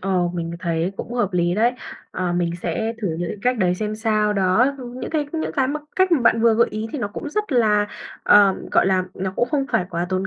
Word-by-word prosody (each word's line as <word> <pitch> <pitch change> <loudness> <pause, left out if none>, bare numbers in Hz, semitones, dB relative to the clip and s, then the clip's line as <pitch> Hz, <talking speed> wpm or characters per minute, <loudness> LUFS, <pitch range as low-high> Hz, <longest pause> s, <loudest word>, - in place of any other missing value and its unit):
ờ, 185 -2 +1
mình 165 -1 -3
thấy 170 +1 -1
cũng 240 - -6
hợp 240 -6 +1
lý 175 0 +1
đấy. 235 +4 +3 0.4
À, 180 -1 -2
mình 175 -1 0
sẽ 220 +7 -1
thử 195 - 0
những 175 - -2
cái - - -5
cách 250 -1 +1
đấy 180 -2 +2
xem 215 +2 -3
sao, 215 -1 +1
đó, 195 +5 +3
ưm, 250 0 -8
những - - -5
cái 305 -2 0
những 320 -1 -2
cái 265 -3 +1
mà 300 +1 -2 0.2
cách 375 -1 +3
mà 295 - +4
bạn 230 -1 +3
vừa 230 -1 +5
gợi 235 +1 +3
ý 215 +1 -4
thì 295 - -3
nó 205 - -2
cũng 290 +8 -6
rất 420 -4 -2
là, 210 -4 +3 0.4
ờ, 200 -2 +6 0.2
gọi - - +4
là, 185 -1 +2
nó 190 0 -3
cũng 240 - +1
không 280 -3 0
phải 180 - +2
quá 170 +1 -2
tốn 185 0 -1
210 Hz, 255 wpm, -22 LUFS, 185-245 Hz, 0.4 s, ờ